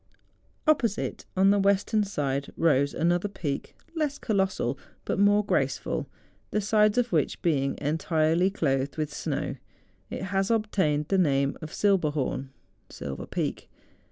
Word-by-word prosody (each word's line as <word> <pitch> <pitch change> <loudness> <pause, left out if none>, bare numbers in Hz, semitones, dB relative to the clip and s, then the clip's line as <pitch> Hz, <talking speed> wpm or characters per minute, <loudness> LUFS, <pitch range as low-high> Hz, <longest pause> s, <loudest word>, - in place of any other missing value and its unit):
Op¬ 310 -1 +6
posite, 225 -4 -2
on 195 +1 +6
the 205 - +3
western 200 +2 +2
side, 140 -8 -2
rose 140 -4 +2
another 175 +4 +1
peak 150 -8 -4 0.2
less 300 -3 -1
colossal, 190 - 0 0.3
but - - -1
more 205 +1 +4
graceful, - - -1 0.4
the 215 - 0
sides 210 +1 +3
of 245 -1 +2
which 155 -5 +1
being 140 -5 +1
entirely 160 +3 +1
clothed 140 -7 -1
with 150 -1 -2
snow, - - -3 0.5
it - - -5
has 195 +1 0
obtained 190 -10 +1
the 195 - +3
name 140 -5 +2
of 155 -1 -7
Silberhorn 150 -9 0 0.4
(Silver 70 -2 -6
Peak). - - -3
175 Hz, 135 wpm, -27 LUFS, 145-205 Hz, 0.5 s, Op¬